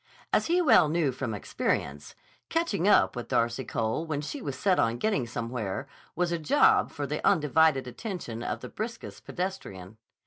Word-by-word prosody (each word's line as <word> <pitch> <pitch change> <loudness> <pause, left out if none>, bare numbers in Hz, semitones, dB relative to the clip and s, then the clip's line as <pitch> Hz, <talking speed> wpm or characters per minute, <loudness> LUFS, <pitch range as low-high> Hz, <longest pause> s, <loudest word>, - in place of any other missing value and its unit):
As - - +3
he 350 +2 +3
well 250 - +6
knew 160 -3 +1
from 125 -3 -4
experience, 75 -6 -3 0.3
catching 330 - 0
up 205 - +4
with 120 - -5
Darcy 120 +3 0
Cole 115 +5 -2
when 155 -3 -3
she 210 - -5
was 140 - -5
set 190 +3 +2
on 115 +1 +2
getting 170 - 0
somewhere 115 0 -4 0.3
was 175 0 0
a 170 - -1
job 415 - +4
for - - -4
the - - -4
undivided 155 -4 +3
attention 125 - -6
of - - -3
the 125 - -7
briskest 230 +2 -7
pedestrian. 110 - -5
150 Hz, 170 wpm, -28 LUFS, 120-195 Hz, 0.3 s, well